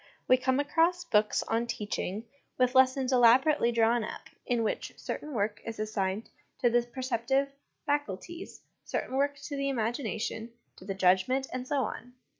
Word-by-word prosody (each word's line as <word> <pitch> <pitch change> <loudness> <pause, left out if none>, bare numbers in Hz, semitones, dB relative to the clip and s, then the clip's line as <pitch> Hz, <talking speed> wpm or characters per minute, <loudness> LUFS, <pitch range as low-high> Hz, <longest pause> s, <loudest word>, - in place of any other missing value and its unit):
We 255 - +7
come 260 +1 +1
across 335 +4 +2
books 210 -8 +2
on 230 +1 -1
teach 210 -2 -3
ing, 210 +5 -3 0.3
with 255 -1 +3
lessons 260 0 +4
elaborately 250 +2 +5
drawn 230 0 +3
up, - - -8 0.2
in 240 -2 +1
which 215 - -3
certain 300 - -5
work 210 -2 -1
is 230 -1 -6
assigned 210 -1 -2 0.3
to 240 - +4
the 240 +1 +4
perceptive 260 +2 -1 0.3
faculties, 290 - -3 0.2
certain 260 - -3
work 285 +1 +1
to 285 - -5
the 275 0 -1
imagination, 230 -2 -2 0.2
to 185 - -13
the 195 -1 -3
judgment, 190 +8 +3
and 255 0 -4
so 280 -2 +1
on. 245 +2 -6
245 Hz, 160 wpm, -29 LUFS, 220-270 Hz, 0.3 s, We